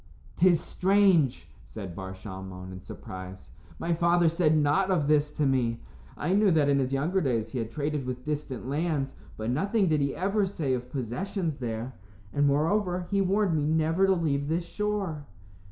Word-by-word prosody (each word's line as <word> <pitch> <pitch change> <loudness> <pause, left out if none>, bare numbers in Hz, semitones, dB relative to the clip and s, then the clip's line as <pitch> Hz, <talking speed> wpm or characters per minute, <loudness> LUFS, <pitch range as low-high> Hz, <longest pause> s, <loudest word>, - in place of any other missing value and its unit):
"'Tis 175 -2 +5
strange," 185 -6 +2 0.2
said 95 -5 -7
Bar 95 0 -6
Shalmon, 95 -1 -8
in 95 0 -9
surprise; 95 0 -9 0.3
"my 170 - -1
father 170 0 +3
said 160 -2 +2
nought 150 +6 +2
of 165 -7 +2
this 150 -1 +3
to 150 0 -1
me. 120 -4 +1 0.4
I 175 +5 0
knew 205 0 +4
that 155 -5 +3
in 140 0 +3
his 130 -1 0
younger 160 +8 +1
days 115 -7 -1
he 130 - -3
had 115 -1 -3
traded 145 +1 -2
with 125 0 -5
distant 145 -5 -4
lands, 145 -1 -1 0.2
but 110 +2 -2
nothing 195 - +1
did 155 -2 +2
he 140 -1 0
ever 200 +2 +1
say 155 -8 -1
of 125 0 -3
possessions 150 - -3
there. 120 +1 -4 0.4
And, 145 0 +3
moreover, 180 +5 +1
he 200 0 +3
warned 195 -2 +2
me 155 - +1
never 160 +5 +2
to 190 - +4
leave 145 -5 0
this 170 +3 -1
shore." 195 -7 -3
150 Hz, 180 wpm, -28 LUFS, 125-180 Hz, 0.4 s, Tis